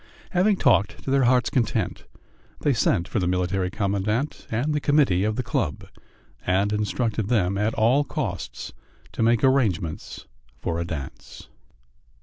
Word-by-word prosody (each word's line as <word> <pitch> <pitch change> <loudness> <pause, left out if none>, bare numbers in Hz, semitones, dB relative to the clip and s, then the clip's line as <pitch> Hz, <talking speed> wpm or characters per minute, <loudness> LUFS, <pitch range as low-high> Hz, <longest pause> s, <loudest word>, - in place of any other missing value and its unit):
Having 195 +3 +3
talked 100 - +2
to 135 - -3
their 135 -2 +3
hearts' 125 0 +3
content, 115 -5 -1 0.6
they 145 - +2
sent 90 -6 +1
for 110 - -1
the 90 - 0
Military 90 +1 0
Commandant 105 +7 -2
and 130 +7 -1
the 150 - +1
committee 140 -11 +3
of 110 +1 0
the 125 - -2
club, 80 - -2 0.6
and 100 +3 +1
instructed 105 0 -1
them 100 -5 +1
at 105 +3 0
all 120 +6 +3
costs 145 - -5 0.4
to - - -4
make 115 0 +3
arrangements 105 - 0 0.3
for 85 +6 -3
a 85 - -2
dance. 75 -6 -8
110 Hz, 145 wpm, -24 LUFS, 95-125 Hz, 0.6 s, Having